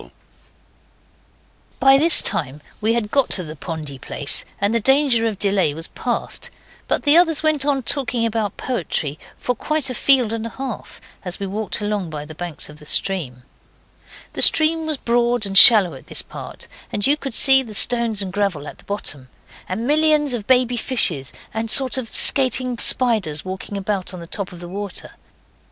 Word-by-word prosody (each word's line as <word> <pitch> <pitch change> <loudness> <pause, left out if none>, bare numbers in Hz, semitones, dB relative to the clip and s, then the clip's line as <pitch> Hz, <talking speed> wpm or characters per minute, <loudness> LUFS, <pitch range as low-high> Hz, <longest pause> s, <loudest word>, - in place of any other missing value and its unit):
By 270 0 +5
this 325 +2 +5
time 150 -5 -1 0.2
we 220 +2 +1
had 220 -3 -3
got 275 -6 +2
by 185 - -4
the 155 -1 -9
pondy 150 -4 -7
place - - -3
and 200 +2 0
the 230 - +1
danger 265 -1 +2
of 215 -3 -4
delay 195 -7 0
was 165 +1 -8
past; 245 -2 -4 0.4
but - - 0
the 290 +1 +4
others 325 -3 +1
went 305 -3 +1
on 275 -3 0
talking 250 -3 +1
about 220 -3 -3
poetry 160 - -4 0.2
for 250 - -2
quite 295 +2 -2
a - - -4
field 250 -3 +3
and 230 0 -4
a - - -7
half, 260 -2 -8 0.2
as 180 -1 0
we 200 - -4
walked 210 +3 -4
along 205 -4 -3
by 150 -1 -7
the 155 - -11
banks 170 -1 -7
of 150 0 -13
the 150 - -14
stream. 145 -13 -2 0.9
The - - -3
stream 315 0 +4
was 310 -2 -3
broad 240 -2 0
and 195 -1 -5
shallow 200 -3 +9
at - - -13
this - - -3
part, - - -10 0.2
and 205 - -1
you 285 - +3
could 275 -5 -7
see 265 0 +6
the 225 -5 -6
stones 230 -3 +3
and 185 -1 -7
gravel 195 -8 -2
at - - -11
the - - -18
bottom, 145 -10 -5 0.4
and 215 +6 -4
millions 300 -1 +2
of 220 -4 -5
baby 250 -1 +2
fishes, 175 - -1 0.2
and 225 +1 -4
a - - +2
sort 265 0 +4
of 235 -3 -8
skating 255 -2 +4
spiders 210 - +1
walking 190 +2 -7
about 195 -1 -4
on - - -9
the 170 - -9
top 190 +2 -5
of 175 -1 -11
the 175 - -8
water. 200 +1 -7
220 Hz, 190 wpm, -19 LUFS, 185-260 Hz, 0.9 s, shallow